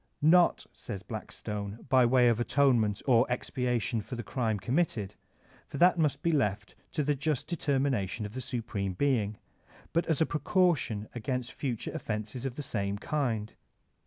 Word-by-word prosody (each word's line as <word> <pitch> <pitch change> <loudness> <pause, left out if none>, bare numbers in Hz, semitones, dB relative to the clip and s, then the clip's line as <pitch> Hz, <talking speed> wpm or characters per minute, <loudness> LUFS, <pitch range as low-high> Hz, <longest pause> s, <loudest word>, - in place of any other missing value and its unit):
"Not," 175 +3 +5
says 95 -1 -7
Blackstone, 105 -1 -6
"by 130 -2 +5
way 125 0 +5
of 115 -1 +3
atonement 120 -5 +2
or 125 -2 +4
expiation 125 -2 -1
for 125 - -7
the 120 - -5
crime 115 -5 -1
committed, 120 - 0 0.5
for - - -6
that 175 +2 +5
must 145 -3 +1
be 170 - +3
left 105 -8 0 0.2
to 150 - 0
the 145 +1 +2
just 145 0 -1
determination 135 - 0
of 105 - -7
the 130 - -4
Supreme 115 -6 -3
Being, 110 -3 +1 0.6
but 170 +1 +1
as 160 -4 +1
a 160 - +4
precaution 150 - +1
against 125 +1 -3
future 125 -6 -3
offenses 110 +4 -4
of 130 -2 -3
the 145 - -5
same 100 -5 -2
kind.'' 115 -5 -2
125 Hz, 160 wpm, -30 LUFS, 110-140 Hz, 0.6 s, Not